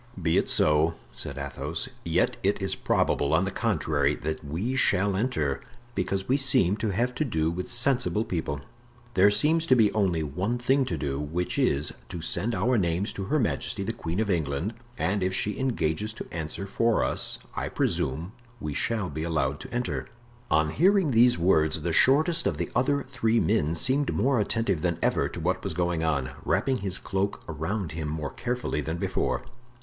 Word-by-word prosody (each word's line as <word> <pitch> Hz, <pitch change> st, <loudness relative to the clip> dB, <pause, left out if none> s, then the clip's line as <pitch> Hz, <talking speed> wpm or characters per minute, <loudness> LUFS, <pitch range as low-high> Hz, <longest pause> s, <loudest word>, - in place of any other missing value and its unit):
"Be 80 Hz, -2 st, +2 dB
it -, -, -2 dB
so," 75 Hz, +2 st, +4 dB, 0.2 s
said -, -, -6 dB
Athos; 70 Hz, -1 st, -3 dB, 0.2 s
"yet -, -, +1 dB
it -, -, +1 dB
is -, -, -1 dB
probable, 70 Hz, +1 st, +1 dB
on 85 Hz, +4 st, +2 dB
the 100 Hz, -, -2 dB
contrary, 75 Hz, -5 st, +1 dB
that 80 Hz, +1 st, -4 dB
we 90 Hz, -, -2 dB
shall 100 Hz, -6 st, +2 dB
enter, 85 Hz, -, -1 dB, 0.3 s
because 95 Hz, -4 st, -2 dB
we 130 Hz, -, +3 dB
seem 130 Hz, -, +4 dB
to 110 Hz, -, -1 dB
have 120 Hz, +6 st, 0 dB
to 155 Hz, -, -1 dB
do 80 Hz, -, 0 dB
with 90 Hz, +2 st, -4 dB
sensible 120 Hz, -3 st, +2 dB
people. 80 Hz, -, -3 dB, 0.5 s
There 100 Hz, +1 st, +6 dB
seems 160 Hz, +9 st, +2 dB
to 130 Hz, -, +6 dB
be 110 Hz, -4 st, +4 dB
only 95 Hz, -7 st, +1 dB
one 90 Hz, -, -2 dB
thing 130 Hz, +2 st, +2 dB
to 125 Hz, -, -3 dB
do, 70 Hz, -2 st, -2 dB
which 80 Hz, +5 st, -2 dB
is, 70 Hz, +2 st, +1 dB, 0.2 s
to 85 Hz, -, -5 dB
send 100 Hz, +8 st, 0 dB
our 120 Hz, +5 st, +2 dB
names 90 Hz, +2 st, 0 dB
to 95 Hz, -, -4 dB
Her 150 Hz, +9 st, +1 dB
Majesty 110 Hz, -4 st, -1 dB
the 115 Hz, -, -2 dB
Queen 85 Hz, -5 st, -4 dB
of 110 Hz, -2 st, +1 dB
England, 80 Hz, +4 st, -1 dB, 0.2 s
and 100 Hz, +2 st, 0 dB
if 95 Hz, 0 st, 0 dB
she 105 Hz, +2 st, -1 dB
engages 110 Hz, -5 st, -1 dB
to 110 Hz, -, -7 dB
answer 80 Hz, +4 st, -4 dB
for 115 Hz, +3 st, +1 dB
us -, -, -1 dB, 0.2 s
I -, -, -2 dB
presume 80 Hz, +8 st, -1 dB, 0.3 s
we 75 Hz, -6 st, -4 dB
shall 110 Hz, +4 st, 0 dB
be 80 Hz, -1 st, -5 dB
allowed 75 Hz, -4 st, -1 dB
to -, -, -9 dB
enter." 125 Hz, 0 st, -2 dB, 0.4 s
On 80 Hz, 0 st, +2 dB
hearing 185 Hz, -, +3 dB
these 120 Hz, -1 st, +5 dB
words 80 Hz, -3 st, +2 dB
the 85 Hz, -1 st, -1 dB
shortest 155 Hz, -, +4 dB
of -, -, -1 dB
the -, -, -3 dB
other 140 Hz, +3 st, +2 dB
three 115 Hz, -4 st, +1 dB
men 85 Hz, -9 st, +1 dB
seemed 135 Hz, +10 st, +1 dB
more 135 Hz, -2 st, +2 dB
attentive 105 Hz, -5 st, 0 dB
than 85 Hz, -1 st, 0 dB
ever -, -, +2 dB
to -, -, -7 dB
what -, -, -1 dB
was -, -, -3 dB
going 85 Hz, -2 st, 0 dB
on, 70 Hz, -5 st, 0 dB
wrapping 135 Hz, -1 st, +1 dB
his 95 Hz, -4 st, 0 dB
cloak 95 Hz, +1 st, -2 dB
around 80 Hz, +3 st, -3 dB
him 80 Hz, -1 st, -4 dB
more 75 Hz, -1 st, -3 dB
carefully 125 Hz, -10 st, -2 dB
than 80 Hz, +3 st, -3 dB
before. -, -, -1 dB
95 Hz, 190 wpm, -27 LUFS, 80-120 Hz, 0.5 s, There